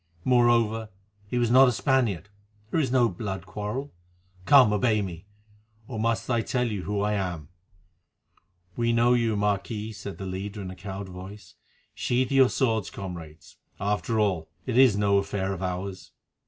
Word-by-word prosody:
Moreover, 115 Hz, -3 st, +3 dB, 0.4 s
he 125 Hz, -, -2 dB
was 120 Hz, -1 st, +1 dB
not 130 Hz, +2 st, +8 dB
a -, -, +3 dB
Spaniard, 120 Hz, -, 0 dB, 0.4 s
there -, -, +1 dB
is 135 Hz, -6 st, 0 dB
no 125 Hz, -2 st, +4 dB
blood 95 Hz, -2 st, -5 dB
quarrel. 105 Hz, +9 st, -5 dB, 0.5 s
Come, 130 Hz, -7 st, +7 dB
obey 110 Hz, +1 st, +2 dB
me! 90 Hz, 0 st, -8 dB, 0.6 s
or 115 Hz, -4 st, -5 dB
must 115 Hz, -2 st, 0 dB
I 120 Hz, -2 st, +1 dB
tell 125 Hz, +2 st, -1 dB
you 105 Hz, -5 st, -3 dB
who 100 Hz, 0 st, -1 dB
I 105 Hz, +1 st, +1 dB
am?" 90 Hz, -7 st, -3 dB, 1.3 s
"We 115 Hz, 0 st, +1 dB
know 120 Hz, +1 st, +4 dB
you, 115 Hz, -3 st, +1 dB
Marquis," 105 Hz, +2 st, -1 dB
said 100 Hz, -1 st, -8 dB
the 95 Hz, -, -6 dB
leader 100 Hz, +3 st, -5 dB
in 95 Hz, -2 st, -6 dB
a -, -, -9 dB
cowed 95 Hz, 0 st, -7 dB
voice. 95 Hz, +3 st, -10 dB, 0.4 s
"Sheath 125 Hz, +1 st, 0 dB
your 135 Hz, -2 st, +5 dB
swords, 110 Hz, -7 st, 0 dB
comrades; 85 Hz, -6 st, -9 dB, 0.2 s
after 105 Hz, +3 st, -1 dB
all, 95 Hz, -6 st, 0 dB, 0.2 s
it 125 Hz, -, -2 dB
is 125 Hz, -5 st, +6 dB
no 100 Hz, -1 st, +3 dB
affair 100 Hz, -1 st, -2 dB
of 95 Hz, -, -7 dB
ours." 95 Hz, +1 st, -4 dB
105 Hz, 165 wpm, -26 LUFS, 95-120 Hz, 1.3 s, not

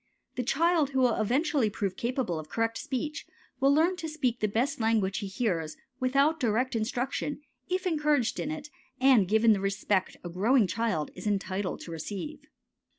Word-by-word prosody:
The 255 Hz, -, -2 dB
child 315 Hz, +4 st, +2 dB
who 265 Hz, -2 st, -1 dB
will 240 Hz, -3 st, +3 dB
eventually 265 Hz, +1 st, +1 dB
prove 200 Hz, -2 st, -3 dB
capable 235 Hz, -, -2 dB
of 155 Hz, -1 st, -9 dB
correct 230 Hz, 0 st, -1 dB
speech 295 Hz, +4 st, -4 dB, 0.3 s
will 275 Hz, +1 st, +4 dB
learn 330 Hz, +5 st, +3 dB
to 320 Hz, -1 st, -4 dB
speak 260 Hz, -6 st, -1 dB
the 215 Hz, -, +1 dB
best 250 Hz, +8 st, 0 dB
language 220 Hz, -4 st, +1 dB
he 205 Hz, -, -4 dB
hears 180 Hz, -7 st, -2 dB, 0.2 s
without 275 Hz, +5 st, +2 dB
direct 245 Hz, +1 st, +1 dB
instruction 250 Hz, +6 st, -2 dB, 0.3 s
if 370 Hz, +1 st, -1 dB
encouraged 300 Hz, -7 st, +1 dB
in 290 Hz, -, -2 dB
it 300 Hz, -1 st, -6 dB, 0.3 s
and 255 Hz, -7 st, +5 dB
given 220 Hz, +2 st, +5 dB
the 200 Hz, -, 0 dB
respect 195 Hz, -1 st, 0 dB
a 175 Hz, -, -5 dB
growing 215 Hz, +7 st, +3 dB
child 195 Hz, -7 st, -1 dB
is -, -, -7 dB
entitled 195 Hz, -2 st, -2 dB
to 170 Hz, -, -8 dB
receive. 205 Hz, -, -5 dB
240 Hz, 170 wpm, -29 LUFS, 205-285 Hz, 0.3 s, and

